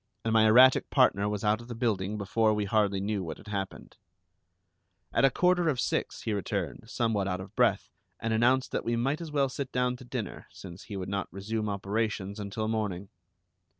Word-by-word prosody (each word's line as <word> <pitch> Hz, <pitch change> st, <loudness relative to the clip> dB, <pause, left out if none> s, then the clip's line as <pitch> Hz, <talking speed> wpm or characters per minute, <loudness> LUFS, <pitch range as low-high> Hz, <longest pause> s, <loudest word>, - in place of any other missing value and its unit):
And 110 Hz, -, +1 dB
my 110 Hz, -1 st, +5 dB
erratic 130 Hz, +4 st, +6 dB
partner 100 Hz, +1 st, +3 dB
was 105 Hz, -1 st, -3 dB
out 105 Hz, +2 st, +2 dB
of 120 Hz, -, -12 dB
the 120 Hz, -, -6 dB
building 105 Hz, -4 st, -1 dB
before 110 Hz, +2 st, +1 dB
we 105 Hz, -1 st, -1 dB
hardly 100 Hz, -1 st, +1 dB
knew 100 Hz, 0 st, -2 dB
what 80 Hz, -3 st, -6 dB
had -, -, -13 dB
happened. 100 Hz, -2 st, -5 dB, 1.2 s
At -, -, +4 dB
a -, -, +6 dB
quarter 180 Hz, +4 st, +2 dB
of 135 Hz, -5 st, -1 dB
six -, -, -2 dB
he 110 Hz, -, -1 dB
returned, 100 Hz, -3 st, -3 dB
somewhat 110 Hz, -5 st, 0 dB
out 90 Hz, -1 st, -2 dB
of 95 Hz, +2 st, -10 dB
breath, -, -, +2 dB, 0.3 s
and 115 Hz, 0 st, -1 dB
announced 125 Hz, +4 st, +2 dB
that -, -, -2 dB
we 120 Hz, -, 0 dB
might 135 Hz, +7 st, 0 dB
as 165 Hz, -2 st, -6 dB
well 140 Hz, -2 st, +2 dB
sit 135 Hz, +1 st, -5 dB
down 125 Hz, 0 st, 0 dB
to 130 Hz, -, -12 dB
dinner, 120 Hz, -5 st, -6 dB
since 90 Hz, -1 st, -11 dB
he 100 Hz, -, -6 dB
would 95 Hz, -, -4 dB
not 100 Hz, -1 st, -3 dB
resume 105 Hz, +3 st, -3 dB
operations 100 Hz, 0 st, -2 dB
until 105 Hz, +2 st, -3 dB
morning. 105 Hz, -4 st, -2 dB
110 Hz, 200 wpm, -29 LUFS, 100-120 Hz, 1.2 s, erratic